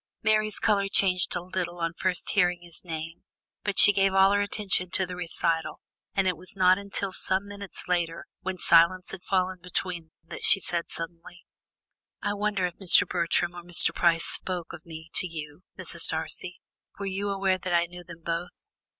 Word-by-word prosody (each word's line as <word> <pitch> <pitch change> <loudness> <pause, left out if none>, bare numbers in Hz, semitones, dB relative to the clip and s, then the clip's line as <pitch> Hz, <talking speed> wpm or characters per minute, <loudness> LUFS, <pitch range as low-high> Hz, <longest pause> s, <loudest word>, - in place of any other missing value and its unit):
Mary's 215 0 +2
colour 200 -2 +1
changed 185 -2 +2
a 175 - -3
little 180 -1 -4
on 165 -1 -2
first 180 0 -1
hearing 180 -3 +1
his 170 -2 -6
name, 165 -1 -6 0.4
but 205 -1 -2
she 205 - +9
gave 195 -1 +2
all 195 0 +6
her 205 0 +2
attention 200 -3 0
to 190 +1 0
the 180 0 -7
recital, 165 -2 -2 0.4
and 195 -1 +2
it 180 - +1
was 185 +3 -4
not 185 0 +4
until 200 -1 -4
some 190 +1 0
minutes 200 -1 -8
later, 170 -2 -1
when 190 0 -4
silence 180 +3 +4
had 190 - -7
fallen 185 -1 0
between 180 -1 -4
them, 160 - -36
that 165 - -9
she - - +5
said 170 -2 +1
suddenly: 170 +1 -8 0.7
"I 205 - -2
wonder 205 -2 -1
if 175 - -6
Mr. 190 -3 +5
Bertram 175 0 0
or 175 - -8
Mr. 175 0 +3
Price 165 -1 +2
spoke 180 -3 -1
of - - -12
me 160 -1 -9
to 185 - +5
you, 155 -1 -8 0.2
Mrs. 170 -2 +3
Darcy. 160 +2 -3 0.4
Were 200 - -5
you 195 +1 -2
aware 195 -1 0
that 180 0 -5
I 170 0 +3
knew 175 +1 -11
them 170 -1 -13
both?" 170 +1 -3
180 Hz, 190 wpm, -27 LUFS, 170-195 Hz, 0.7 s, she